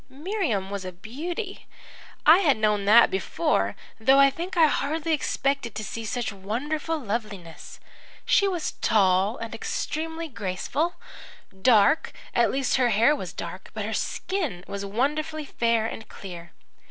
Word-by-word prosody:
"Miriam 275 - -2
was 200 -1 -4
a 185 - -5
beauty. 320 - -6 0.6
I 320 +4 +8
had 295 - +3
known 210 -2 +1
that 225 +3 +7
before, 165 - 0 0.2
though 265 +5 +5
I 275 0 +7
think 350 +6 -5
I 325 - +7
hardly 315 +2 0
expected 275 -5 -1
to 215 - -4
see 225 +2 -5
such 235 -1 -2
wonderful 285 +12 -3
loveliness. 210 - -6 0.5
She 400 - +4
was 355 -5 -2
tall 195 +1 +3
and 230 0 -6
extremely 320 +7 -3
graceful, 255 - -2 0.7
dark 230 +6 +4 0.2
at - - +3
least 270 -1 +1
her 250 -2 +3
hair 230 +7 +4
was - - -6
dark, - - -7
but - - -3
her - - -3
skin 315 - -2
was 200 0 -5
wonderfully 300 +9 -1
fair 230 -4 +1
and 225 -1 -6
clear. 175 -3 -9
240 Hz, 145 wpm, -25 LUFS, 200-310 Hz, 0.7 s, I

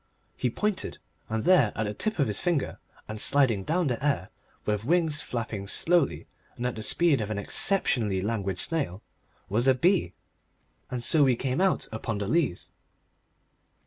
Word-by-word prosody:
He 125 - 0
pointed, 210 - -2 0.3
and 110 0 -1
there 155 - +5
at 110 - -1
the 105 - -3
tip 215 - -2
of 145 - +3
his 105 -4 -1
finger 170 -6 -1 0.3
and 110 0 -4
sliding 130 -9 +3
down 170 - 0
the 125 -2 -2
air 140 -10 0 0.3
with 105 -1 -1
wings 160 +1 +2
flapping 110 -4 -4
slowly 170 - +1 0.3
and 120 - -4
at 125 - 0
the 110 - -6
speed 150 +4 +2
of 105 - -3
an 110 - -3
exceptionally 110 - +1
languid 100 -2 -2
snail 140 - 0 0.4
was 115 +6 0
a 130 - +5
bee. 170 - +2 0.8
And 125 -2 -4
so 150 +4 +4
we 130 -3 +4
came 130 +5 -1
out 190 -1 +1
upon 110 0 -3
the 100 -1 -3
Leas. 155 - 0
125 Hz, 170 wpm, -27 LUFS, 105-160 Hz, 0.8 s, there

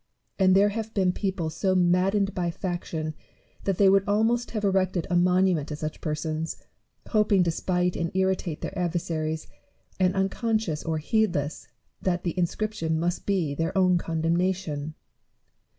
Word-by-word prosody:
And 185 -1 +5
there 200 +1 +5
have 220 +1 -5
been 190 -3 +3
people 185 -4 -2
so 190 +3 0
maddened 185 +3 +2
by 175 -2 -1
faction, 170 -3 -4 0.5
that 195 -3 0
they 200 - +5
would 195 0 +5
almost 225 +4 +2
have 215 -2 -3
erected 185 -3 +1
a - - +2
monument 180 -3 +3
to 150 - -4
such 155 +1 -5
persons, 155 +1 -3 0.5
hoping 210 -4 +3
to 170 - +1
spite 180 +1 0
and 170 0 -1
irritate 190 -4 0
their - - -5
adversaries, 160 -3 -2 0.5
and 185 0 +2
unconscious 195 -3 0
or 160 -1 -1
heedless 155 - 0 0.3
that 180 -2 0
the 170 - -2
inscription 180 -2 -1
must 175 +2 -2
be 180 -8 +1
their 165 +6 -2
own 185 -2 +4
condemnation. 165 -2 -1
180 Hz, 150 wpm, -26 LUFS, 165-195 Hz, 0.5 s, And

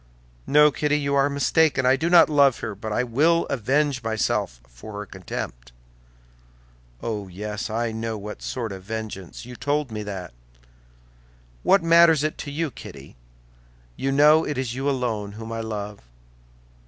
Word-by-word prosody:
"No, 150 +1 +6
Kitty, 150 +1 0
you 140 -1 -1
are 140 0 +3
mistaken. 140 -1 +2
I 130 +1 +5
do 160 +5 -1
not 175 -1 +7
love 140 -5 +4
her, - - -4
but 110 +2 -6
I 125 - +1
will 155 +8 +2
avenge 135 +2 +1
myself 110 - -1
for 65 - -12
her 105 0 -5
contempt." - - -7 1.3
"Oh, 105 -3 -3
yes, 105 +4 -5
I 115 +1 -1
know 110 0 -4
what 105 +1 -8
sort 115 -4 -4
of 95 -1 -7
vengeance! 105 -2 -7
You 125 0 -9
told 145 0 -1
me 105 -1 -4
that!" 95 -7 -6 1.3
"What 195 - +4
matters 165 -2 +6
it 155 - -2
to 145 - -5
you, 155 0 -2
Kitty? - - -11 0.8
You 135 - -1
know 150 +3 +6
it 150 - -3
is 130 -3 -2
you 135 +3 -1
alone 115 -6 -2
whom 110 +1 -8
I 115 - -3
love." 105 -2 -5
120 Hz, 160 wpm, -24 LUFS, 105-145 Hz, 1.3 s, not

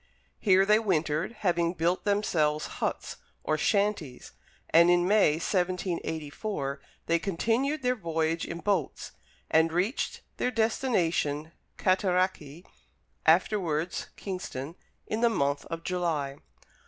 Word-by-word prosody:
Here 195 -2 +4
they 210 +2 +5
wintered, 165 -3 0
having 170 -2 +1
built 170 +4 0
themselves 160 -7 +1 0.2
huts, - - -2 0.3
or 155 - +1
shanties, 195 - 0 0.4
and 170 +2 +6
in 175 0 +4
May, 200 -6 +5
1784, 165 -3 -2 0.2
they 170 0 +2
continued 230 - 0
their 250 0 +3
voyage 165 -5 -1
in 170 0 -5
boats, 205 -2 -1 0.4
and 160 +1 +4
reached 185 - -1 0.2
their - - +1
destination, 175 - 0 0.3
Cataraqui, 185 -4 0 0.6
afterwards 170 -1 +2
Kingston, 170 -7 -5 0.3
in 220 - -3
the 235 - +5
month 140 -9 0
of 165 0 -5
July. 160 -7 -1
175 Hz, 110 wpm, -28 LUFS, 160-200 Hz, 0.6 s, and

